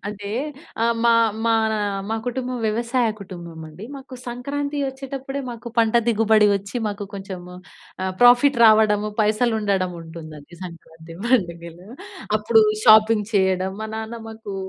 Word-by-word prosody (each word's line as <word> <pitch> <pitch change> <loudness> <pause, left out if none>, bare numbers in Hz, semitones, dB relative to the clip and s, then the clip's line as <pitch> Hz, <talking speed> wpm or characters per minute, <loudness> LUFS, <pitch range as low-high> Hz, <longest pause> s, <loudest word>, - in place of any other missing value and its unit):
అంటే, 205 -1 -6 0.5
ఆహ్, 235 0 +2
మా 235 - +5 0.3
మానా 220 -1 +2 0.3
మా 225 - 0
కుటుంబం 250 0 -3
వ్యవసాయ 235 +2 0
కుటుంబం 175 -4 -9
అండి. 170 +7 -11
మాకు 265 -1 -11
సంక్రాంతి 285 +4 -4
వచ్చేటప్పుడే, 270 +1 -6
మాకు 235 0 -8
పంట 225 -1 +3
దిగుబడి 220 -2 +4
వచ్చి 200 +4 -4
మాకు 205 0 -4
కొంచెము 185 -2 -8 0.5
ఆహ్, 190 - -2
ప్రాఫిట్ 245 +3 +6
రావడము, 215 -1 +4
పైసలుండడముంటుందండి 180 - -2
సంక్రాంతి 165 -1 -12
పండుగలో. 175 -6 -1 0.5
అప్పుడూ 220 +1 +4 0.2
షాపింగ్ 215 -1 +6
చెయ్యడం. 190 -1 +2
మా 220 - -5
నాన్న 220 +1 -6
మాకూ 220 -2 -8
215 Hz, 125 wpm, -22 LUFS, 190-235 Hz, 0.5 s, ప్రాఫిట్